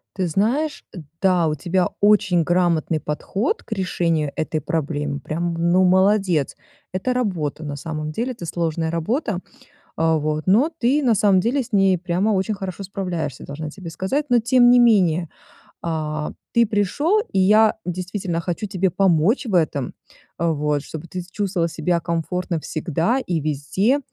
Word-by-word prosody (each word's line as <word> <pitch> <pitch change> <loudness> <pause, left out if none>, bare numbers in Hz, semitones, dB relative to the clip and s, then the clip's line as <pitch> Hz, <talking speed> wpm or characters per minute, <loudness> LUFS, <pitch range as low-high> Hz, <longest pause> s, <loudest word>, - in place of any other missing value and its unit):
Ты 185 -3 -1
знаешь, 245 - 0 0.4
да, 180 -4 +3
у 155 - 0
тебя 180 +5 0
очень 200 -4 +4
грамотный 170 -2 +1
подход 195 - -2
к - - -24
решению 170 -6 0
этой 155 -1 -2
проблемы, 145 -1 -2
прям, 170 +4 -3
ну, 170 +3 +2
молодец. 190 -4 +3 0.4
Это 190 +8 -1
работа, 170 - -2
на 145 -1 -4
самом 155 +1 -5
деле. 240 +10 -2
Это 225 -8 -8
сложная 165 -1 -2
работа. 180 - -1 0.6
А 160 0 +2
вот, 155 +2 -2
но 240 - +4
ты, 270 +5 +2
на 240 -4 +3
самом 195 -2 +4
деле, 255 +6 +1
с 230 - -13
ней 195 -3 +4
прямо 180 +4 0
очень 200 +2 0
хорошо 190 0 -6
справляешься, 175 -8 -4
должна 150 +2 -6
тебе 175 -1 -9
сказать. 265 - -2
Но 245 -2 +4
тем 245 +1 +5
не 245 - +6
менее, 180 -8 +4 0.6
а, 155 -2 -2 0.2
ты 235 0 +5
пришел, 245 - +1
и 190 - +1
я 215 +3 +5
действительно 180 -1 -3
хочу 175 +4 -3
тебе 190 -1 0
помочь 190 - +2
в 215 - -4
этом, 150 -7 +1 0.5
э, 170 - +1
вот, 150 -2 0
чтобы 160 +2 -8
ты 180 +2 -5
с 175 - -13
чувствовал 185 -5 -1
себя 170 +1 -1
комфортно 170 +1 -2
всегда 165 - -1
и 175 -9 -2
везде, 155 - 0
180 Hz, 160 wpm, -22 LUFS, 160-205 Hz, 0.6 s, не